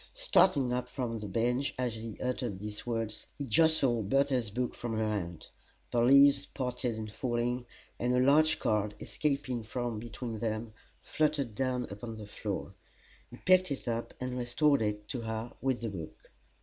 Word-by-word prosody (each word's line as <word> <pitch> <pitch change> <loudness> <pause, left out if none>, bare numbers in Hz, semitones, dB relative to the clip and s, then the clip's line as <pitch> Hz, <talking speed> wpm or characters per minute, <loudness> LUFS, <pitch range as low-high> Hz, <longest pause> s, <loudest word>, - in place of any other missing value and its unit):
Starting 185 - +4
up 125 0 -1
from 120 -3 -3
the 105 - -5
bench 120 +7 0
as 125 -2 -1
he 110 -1 -7
uttered 125 -5 -2
these 105 +3 -7
words 115 -2 -3
he 140 - -3
jostled 130 -5 +3
Bertha's 135 -4 +2
book 125 +4 -2
from 115 -2 -3
her 110 - +1
hand. 90 -6 -3 0.4
The 120 -1 +2
leaves 140 +3 +6
parted 125 -3 -2
in 110 0 -4
falling, 120 +2 -2 0.3
and 125 +1 +1
a - - +4
large 155 +4 +5
card, 105 -1 0
escaping 140 -5 -1
from 115 0 -3
between 115 0 -5
them, 110 0 -2 0.3
fluttered 150 -6 0
down 125 +2 0
upon 110 +3 -6
the 110 -1 -8
floor. 105 - -4 0.6
He 120 - -11
picked 185 +2 +4
it 140 -3 -4
up 115 0 -2
and 125 0 -3
restored 140 +3 +3
it 105 -1 -2
to 125 - -3
her, 110 +1 -4
with 130 -2 0
the 115 - -2
book. 85 -6 -9
120 Hz, 170 wpm, -31 LUFS, 110-130 Hz, 0.6 s, leaves